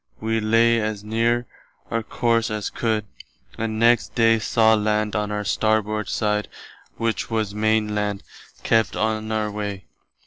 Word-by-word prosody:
We 110 +1 0
lay 115 +2 +3
as 105 -1 -3
near 115 +3 0 0.5
our 115 - 0
course 115 +1 0
as 105 -2 -3
could, 110 -3 -1 0.5
and 110 -1 -3
next 115 +1 +3
day 115 -1 +4
saw 110 +1 +3
land 105 0 0
on 105 -1 -1
our 105 0 -2
starboard 110 0 0
side 105 -1 0 0.5
which 115 -1 -1
was 110 -3 -1
the 105 - -9
Maine 110 0 +1
[Land]. 105 -1 -2 0.4
Kept 115 -1 +2
on 110 0 -1
our 110 -1 -1
way. 100 -3 -5
110 Hz, 150 wpm, -23 LUFS, 105-115 Hz, 0.5 s, day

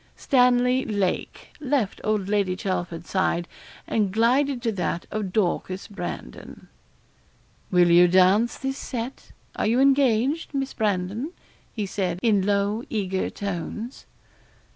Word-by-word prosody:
Stanley 250 0 +3
Lake 200 -4 -2
left 270 -8 -1
old 215 -3 0
Lady 200 -3 +1
Chelford's 175 -3 -3
side, 175 -2 0 0.4
and 210 -4 0
glided 250 +5 +2
to 230 - +1
that 180 -3 -2
of 210 -3 -3
Dorcas 185 -1 -1
Brandon. 175 - -8 1.0
'Will 175 -1 +4
you 175 +1 +7
dance 190 +6 +4
this 270 0 -4
set 245 +1 -6 0.2
are - - 0
you 235 +3 +2
engaged, 275 +2 +2
Miss 270 -1 -2
Brandon?' 210 - -1 0.4
he 215 -3 -3
said, 185 -3 -2
in 215 -4 +3
low 205 +3 0
eager 190 -4 -1
tones. 205 +5 -5
210 Hz, 120 wpm, -24 LUFS, 185-245 Hz, 1.0 s, you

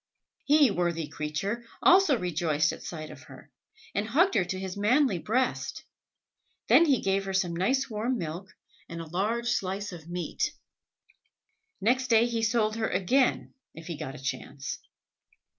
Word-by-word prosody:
He, 290 -2 +5
worthy 170 -3 -1
creature, 175 +12 -3 0.2
also 365 -7 +5
rejoiced 160 -4 0
at - - -10
sight 155 -2 -7
of - - -12
her, - - -14 0.4
and 205 +1 -1
hugged 340 +11 +3
her 190 - +3
to 185 +1 -4
his 190 -1 -5
manly 215 - +2
breast. 250 +8 -1 0.8
Then 335 - +7
he 275 -7 +3
gave 195 0 +1
her 195 - -3
some 180 -3 0
nice 260 +10 +1
warm 235 +2 -1
milk, 175 +1 -5 0.4
and 170 - -6
a 165 - -5
large 215 +8 -1
slice 200 -2 -2
of 170 -2 -10
meat. 175 0 -2 1.3
Next 255 +5 +2
day 230 -1 +5
he 235 -1 -1
sold 220 -1 +1
her 220 - 0
again, 250 +7 +1 0.2
if 165 - -10
he 170 -1 -5
got 150 -2 -6
a - - -9
chance. 135 0 -4
195 Hz, 160 wpm, -28 LUFS, 170-240 Hz, 1.3 s, Then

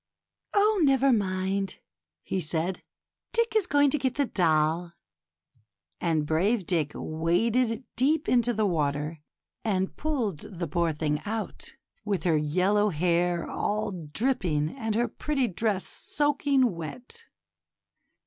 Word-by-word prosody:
Oh! 415 0 +4
never 270 -2 +4
mind," 195 -1 -1 0.5
he 190 - -2
said, 165 +3 -1 0.3
" - - -55
Dick 465 -1 +1
is 420 -4 +3
going 285 -3 +4
to 300 - +1
get 260 -1 -1
the 285 - +2
doll; 165 -3 +1 0.5
' 100 -7 -42
and 160 -3 +1
brave 185 +7 +1
Dick 160 -5 0
waded 225 +10 0
deep 295 +5 +2
into 240 -1 +3
the 215 -2 +1
water, 150 -2 -1 0.4
and 190 -3 -1
pulled 245 - -1
the 175 -1 -5
poor 170 +2 +1
thing 150 -1 -1
out, 220 +1 -5 0.3
with 200 -6 -1
her 170 -3 +3
yellow 185 +8 +2
hair 175 0 +1
all 210 0 -1
dripping 170 - -1
and 225 -5 -2
her 240 +2 +2
pretty 270 +2 -1
dress 200 0 -1
soaking 285 -4 +1
wet. 245 - -7
195 Hz, 130 wpm, -27 LUFS, 165-250 Hz, 0.5 s, Oh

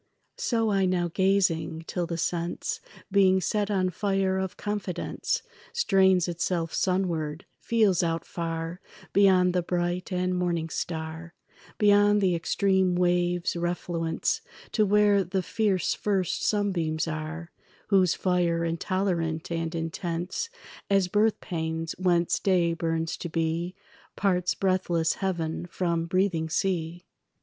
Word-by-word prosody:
So 225 - +1
I 195 -1 +2
now 175 -1 0
gazing; 185 -4 +1
till 175 0 -2
the 170 - -3
sense 170 +1 -2 0.3
Being 190 -1 +5
set 205 +3 0
on 185 -3 +1
fire 195 0 0
of 190 -1 -4
confidence 205 -4 -2 0.3
Strains 190 - +3
itself 170 -1 -1
sunward, 170 -4 -1
feels 210 -6 +2
out 165 -1 -1
far 165 +1 -4 0.3
Beyond 185 -2 +5
the 180 - +2
bright 175 +2 -2
and 180 0 0
morning 170 -2 -1
star, 160 +1 -5 0.4
Beyond 205 0 +5
the 190 -3 +2
extreme 190 +2 +1
wave's 175 -1 +1
refluence, 170 -1 -1 0.3
To 215 -2 +2
where 205 -1 +4
the 185 +1 -2
fierce 200 -6 +1
first 195 -4 -1
sunbeams 170 -7 0
are 160 +2 -5 0.4
Whose 190 -4 +4
fire 175 -2 +1
intolerant 170 -1 -1
and 165 0 -2
intense 170 - -3 0.4
As 195 -2 +3
birthpangs 165 -6 0
whence 175 -2 +2
day 175 -3 +2
burns 165 0 -1
to 175 - -5
be 165 +2 -1 0.4
Parts 180 -3 +1
breathless 185 -4 +1
heaven 175 -3 -2
from 170 -2 -1
breathing 175 -3 +1
sea. 175 -1 -1
180 Hz, 120 wpm, -27 LUFS, 165-190 Hz, 0.4 s, Being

